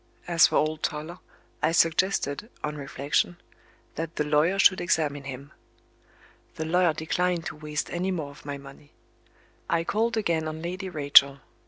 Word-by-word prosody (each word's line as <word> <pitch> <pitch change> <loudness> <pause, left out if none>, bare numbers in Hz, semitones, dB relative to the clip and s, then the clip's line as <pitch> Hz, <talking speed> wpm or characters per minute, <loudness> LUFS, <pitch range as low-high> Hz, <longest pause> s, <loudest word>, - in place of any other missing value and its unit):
As 170 -2 +5
for - - -3
old 155 0 +1
Toller, 160 +3 -4 0.4
I - - +2
suggested 165 - +1
(on 150 0 -3
reflection) 145 +4 -1 0.6
that 165 0 -5
the 150 - 0
lawyer 150 +5 +2
should 185 -2 +5
examine 150 -5 0
him. 135 +1 -8 1.0
The 160 - -4
lawyer 175 0 +2
declined 170 +2 -1
to - - -5
waste 150 0 -4
any 180 +2 -2
more 160 -6 -3
of 140 - -16
my 145 -1 -5
money. 140 +1 -15 0.8
I 165 0 +1
called 225 +6 0
again 165 -6 0
on 155 +1 -6
Lady 185 +2 -4
Rachel. 140 -3 +5
160 Hz, 155 wpm, -26 LUFS, 145-175 Hz, 1.0 s, As